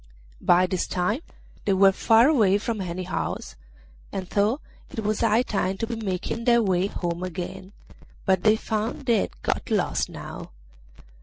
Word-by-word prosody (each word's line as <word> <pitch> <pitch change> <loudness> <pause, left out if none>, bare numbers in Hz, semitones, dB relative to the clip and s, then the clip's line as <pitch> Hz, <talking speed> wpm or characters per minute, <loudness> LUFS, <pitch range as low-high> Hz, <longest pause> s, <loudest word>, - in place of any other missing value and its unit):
By 180 +1 +5
this 185 -1 -1
time 190 - 0 0.4
they 200 - +3
were 195 +1 +6
far 225 +5 +5
away 215 -10 +4
from 215 0 -3
any 185 0 -4
house, 180 - -4 0.6
and 190 -2 -4
thought 210 +8 +1 0.3
it 220 - -5
was 210 0 0
high 230 +1 +3
time 195 -5 -1
to 225 - -1
be 230 +1 -4
making 215 +1 -3
their 235 -1 +5
way 185 -1 +2
home 175 -3 -3
again, 185 +1 -6 0.5
but 190 -2 +3
they 215 +2 +5
found 220 +4 -3
they 235 -3 +4
had - - -4
got - - -1
lost - - 0
now. - - -8
200 Hz, 165 wpm, -25 LUFS, 185-225 Hz, 0.6 s, were